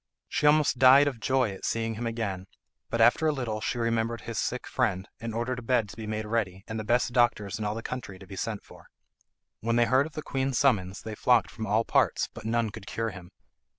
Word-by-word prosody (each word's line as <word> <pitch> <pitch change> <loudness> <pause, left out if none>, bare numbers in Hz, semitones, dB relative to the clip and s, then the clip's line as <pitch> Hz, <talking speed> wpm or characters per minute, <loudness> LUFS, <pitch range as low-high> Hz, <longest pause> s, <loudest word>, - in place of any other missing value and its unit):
She 150 - +1
almost 150 -4 +4
died 135 +2 +8
of 130 -5 -3
joy 130 -2 +1
at 95 - -10
seeing 115 0 -1
him 115 +2 -4
again, 100 -5 -3 0.4
but 115 - 0
after 120 +7 +5
a - - +4
little 120 -7 -3
she 120 - -2
remembered 115 0 0
his 115 - -4
sick - - -2
friend, 95 +1 -1
and 115 0 -4
ordered 120 +2 -2
a - - -8
bed 115 -2 +1
to - - -10
be 110 -1 -7
made 110 0 -3
ready 105 -4 -2
and 110 0 -4
the - - -3
best 120 +2 +1
doctors 105 -4 +1
in 105 - -3
all 105 +1 -1
the 115 - -5
country 125 -7 -6
to 95 - -13
be 95 +1 -9
sent 105 +1 -4
for. - - -16 0.7
When 115 +1 0
they 120 0 +4
heard 130 +4 +3
of 160 - -15
the 155 - -5
queen's 135 -2 -1
summons 100 -8 +1
they 110 - -6
flocked 120 +2 +3
from 110 -2 -5
all 110 +3 +2
parts, - - +2
but 115 - -10
none 115 -1 0
could 100 - -10
cure 115 0 -2
him. 90 -2 -11
115 Hz, 240 wpm, -28 LUFS, 105-125 Hz, 0.7 s, died